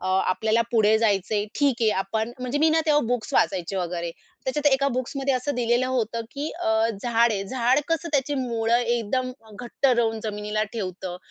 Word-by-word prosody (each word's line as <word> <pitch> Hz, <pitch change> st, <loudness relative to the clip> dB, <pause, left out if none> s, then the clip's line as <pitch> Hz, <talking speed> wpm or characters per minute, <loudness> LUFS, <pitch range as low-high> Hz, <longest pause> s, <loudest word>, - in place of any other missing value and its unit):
अ, 185 Hz, -, -5 dB, 0.2 s
आपल्याला 220 Hz, +4 st, +1 dB
पुढे 220 Hz, -2 st, +4 dB
जायचंय 205 Hz, -1 st, +1 dB
ठीक 280 Hz, -4 st, +3 dB
आहे, 220 Hz, -, +4 dB
आपण" 220 Hz, +4 st, -2 dB
म्हणजे 255 Hz, +3 st, -2 dB
मी 320 Hz, +1 st, +4 dB
ना 320 Hz, +1 st, +3 dB
तेव्हा 295 Hz, -1 st, +4 dB
बुक्स 240 Hz, -3 st, -2 dB
वाचायचे 190 Hz, +1 st, +1 dB
वगैरे. 170 Hz, -1 st, -3 dB, 0.3 s
त्याच्यात 285 Hz, +3 st, -1 dB
एका 275 Hz, +1 st, +3 dB
बुक्समध्ये 265 Hz, +2 st, -1 dB
असं 270 Hz, +3 st, -2 dB
दिलेलं 245 Hz, +1 st, +1 dB
होतं 235 Hz, -3 st, -1 dB
की 290 Hz, +2 st, -4 dB
अ, 350 Hz, -, -6 dB, 0.4 s
झाड 235 Hz, -1 st, +3 dB
आहे, 195 Hz, -1 st, -2 dB
झाड 260 Hz, +2 st, +2 dB
कसं 330 Hz, +1 st, -1 dB
त्याची 285 Hz, +1 st, +1 dB
मूळं 230 Hz, -1 st, 0 dB
एकदम 240 Hz, +1 st, -1 dB, 0.2 s
अ, -, -, -16 dB
घट्ट 245 Hz, +3 st, -1 dB
रवून 230 Hz, -3 st, +2 dB
जमिनीला 210 Hz, 0 st, -2 dB
ठेवतं. 185 Hz, -4 st, -5 dB
235 Hz, 180 wpm, -24 LUFS, 215-260 Hz, 0.4 s, पुढे